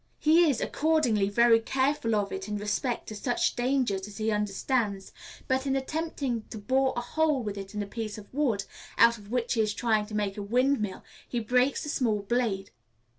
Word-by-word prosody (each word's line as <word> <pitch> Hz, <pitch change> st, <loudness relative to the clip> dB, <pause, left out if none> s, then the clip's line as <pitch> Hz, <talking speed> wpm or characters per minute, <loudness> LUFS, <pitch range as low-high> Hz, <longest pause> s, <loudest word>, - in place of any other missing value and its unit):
He 320 Hz, +2 st, +5 dB
is, 265 Hz, -, 0 dB
accordingly, 275 Hz, -11 st, +1 dB
very 230 Hz, +2 st, +5 dB
careful 260 Hz, -1 st, 0 dB
of 205 Hz, -1 st, 0 dB
it 190 Hz, +1 st, -5 dB
in 210 Hz, 0 st, -2 dB
respect 210 Hz, +4 st, -2 dB
to 215 Hz, -, -6 dB
such 240 Hz, +4 st, 0 dB
dangers 240 Hz, -6 st, 0 dB
as 205 Hz, -, -11 dB
he 220 Hz, 0 st, 0 dB
understands, 210 Hz, 0 st, -1 dB, 0.4 s
but 260 Hz, +1 st, 0 dB
in 270 Hz, -, +1 dB
attempting 270 Hz, -3 st, -2 dB
to 225 Hz, -, -7 dB
bore 260 Hz, +5 st, +1 dB
a -, -, 0 dB
hole 300 Hz, +1 st, +1 dB
with 205 Hz, -2 st, -4 dB
it 195 Hz, +1 st, -8 dB
in 210 Hz, -, -1 dB
a -, -, -5 dB
piece 215 Hz, 0 st, -5 dB
of 210 Hz, +2 st, -12 dB
wood, 250 Hz, -9 st, +1 dB, 0.3 s
out 235 Hz, 0 st, +5 dB
of 205 Hz, -1 st, -14 dB
which 245 Hz, +1 st, 0 dB
he 225 Hz, -, +2 dB
is 215 Hz, -1 st, 0 dB
trying 220 Hz, -3 st, +1 dB
to 215 Hz, -, -7 dB
make 205 Hz, -1 st, -1 dB
a -, -, -3 dB
windmill, 235 Hz, -1 st, 0 dB, 0.3 s
he 240 Hz, -, -1 dB
breaks 250 Hz, +4 st, +1 dB
the 295 Hz, -, -5 dB
small 220 Hz, -8 st, 0 dB
blade. 205 Hz, -3 st, -1 dB
230 Hz, 200 wpm, -28 LUFS, 210-260 Hz, 0.4 s, He